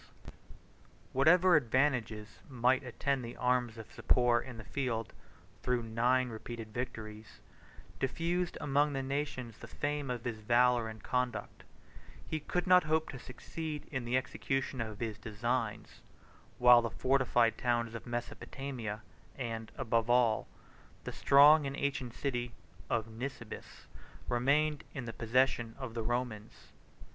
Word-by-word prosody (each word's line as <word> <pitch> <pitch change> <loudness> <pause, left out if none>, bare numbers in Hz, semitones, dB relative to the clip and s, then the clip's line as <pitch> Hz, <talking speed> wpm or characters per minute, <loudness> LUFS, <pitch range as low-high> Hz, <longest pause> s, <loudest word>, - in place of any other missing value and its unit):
] - - -30 0.3
Whatever 175 +6 +6
advantages 120 -5 +1
might 125 0 +2
attend 135 +1 -1
the 120 0 -7
arms 125 -2 +1
of 110 - -10
Sapor 120 -2 +3
in 125 -2 -9
the 110 - -8
field, 115 -2 -3 0.5
though 125 - +1
nine 120 +3 +1
repeated 115 -1 -7
victories 110 -3 -6 0.6
diffused 170 +6 -1
among 145 +1 +2
the 135 -1 -2
nations 135 -4 -3
the - - -9
fame 145 -1 -3
of 120 -2 -3
his 115 -3 -3
valor 120 +1 +3
and 110 -1 -10
conduct, 125 -1 -2 0.6
he 155 - -2
could 175 +4 -2
not 180 -2 +6
hope 160 +1 +1
to 135 - -7
succeed 150 +4 -6
in 130 -4 -2
the 120 +2 +1
execution 135 0 -2
of 110 -2 -5
his 110 -3 -3
designs, 110 -1 -3 0.6
while 125 -1 +8
the 115 - -2
fortified 125 -2 +2
towns 120 -2 0
of 115 +1 -7
Mesopotamia, 120 -2 -5 0.3
and, 115 -4 -5
above 115 -3 0
all, 120 -3 +3 0.6
the - - -5
strong 145 +1 +6
and 140 - -5
ancient 130 -4 -2
city 120 -3 -2 0.4
of 115 -2 0
Nisibis, 115 0 -8 0.4
remained 145 +5 +2
in 135 -3 -4
the 115 - -5
possession 120 0 +1
of 130 -4 -6
the 115 - -3
Romans. 115 -2 -4
125 Hz, 135 wpm, -32 LUFS, 115-135 Hz, 0.6 s, while